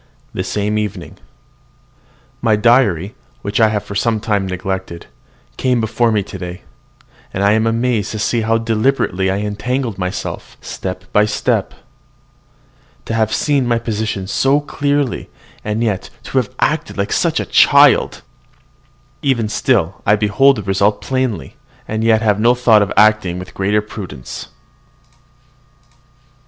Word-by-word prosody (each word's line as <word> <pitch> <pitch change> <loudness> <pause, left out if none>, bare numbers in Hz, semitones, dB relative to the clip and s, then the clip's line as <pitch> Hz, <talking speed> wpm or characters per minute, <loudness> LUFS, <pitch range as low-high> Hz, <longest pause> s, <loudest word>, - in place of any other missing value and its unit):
THE - - -2
SAME 105 +1 -1
EVENING. 105 -4 -5 1.2
My 115 -2 +3
diary, 105 -4 +2 0.3
which 100 0 -2
I 110 - +6
have 105 -2 -2
for - - -8
some 110 +2 0
time 105 -3 -1
neglected, 95 -1 -4 0.5
came 125 -2 +1
before 115 +1 +1
me 105 -2 +1
today; 90 -2 -8 0.7
and 95 - -2
I 100 - +4
am 110 +1 +2
amazed 115 -2 0
to - - -3
see 115 +2 0
how 115 +1 +2
deliberately 115 -4 0
I 95 - 0
have 105 - -2
entangled 115 +1 -3
myself 90 0 -5
step 90 -1 -6
by 105 - +5
step. 105 - -1 1.3
To - - -4
have 110 -1 +1
seen 140 -4 +1
my 120 -1 +2
position 110 -4 -3
so 135 +8 +2
clearly, 145 -2 -1 0.3
and 105 +2 -1
yet 105 -5 -2
to - - 0
have - - -3
acted - - 0 0.2
so - - +2
like - - -1
a - - -2
child! - - +4 1.0
Even 125 -6 +1
still 105 -5 0
I 105 - +4
behold 110 +7 +3
the 105 - -5
result 100 +2 +1
plainly, 130 -9 -2 0.3
and 110 +1 -2
yet 110 0 +3
have 105 -2 +2
no 120 +3 +4
thought 115 -4 +4
of 100 - 0
acting 105 -4 +4
with 90 0 -9
greater 105 +2 0
prudence. 90 - -8
110 Hz, 145 wpm, -17 LUFS, 100-115 Hz, 1.3 s, I